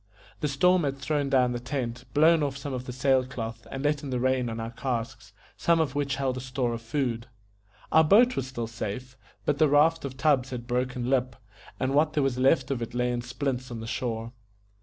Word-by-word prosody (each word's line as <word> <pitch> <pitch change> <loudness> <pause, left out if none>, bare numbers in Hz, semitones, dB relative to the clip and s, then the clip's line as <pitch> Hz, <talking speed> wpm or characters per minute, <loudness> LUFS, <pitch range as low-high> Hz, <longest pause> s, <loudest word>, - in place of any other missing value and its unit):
The 150 - 0
storm 180 +6 +3
had 135 -1 -1
thrown 140 +1 -1
down 130 -2 +3
the 120 - -2
tent, 125 -1 -4
blown 160 +2 +5
off 140 -2 -1
some 140 0 -5
of 125 0 -4
the 125 - -5
sail 130 +1 +2
cloth, 115 -3 -6
and 135 +3 -5
let 145 -1 +1
in 145 - -6
the 125 -1 -1
rain 130 -1 +1
on 115 0 -5
our 115 +1 -4
casks, 115 -4 -4 0.3
some 170 -1 +3
of 155 -5 0
which 140 -1 -1
held 135 -2 -1
a - - -4
store 130 -1 -2
of 115 - -5
food. 115 0 -2 0.6
Our 160 - +6
boat 235 +10 +5
was 130 - -2
still 120 -3 -4
safe, 115 +3 -6 0.3
but 145 -1 +1
the 155 - +5
raft 155 +3 +4
of 130 -2 -6
tubs 135 -2 +2
had 125 -2 -6
broken 125 0 -1
Lip, 130 -2 +1 0.4
and 130 +1 0
what 150 +2 +3
there 150 - +2
was 130 -2 0
left 135 0 +3
of 130 -3 -2
it 115 +1 -5
lay 125 0 +1
in 120 0 -2
splints 125 +1 -3
on 120 -2 -6
the 110 - -6
shore. 115 0 -3
130 Hz, 225 wpm, -27 LUFS, 120-140 Hz, 0.6 s, Our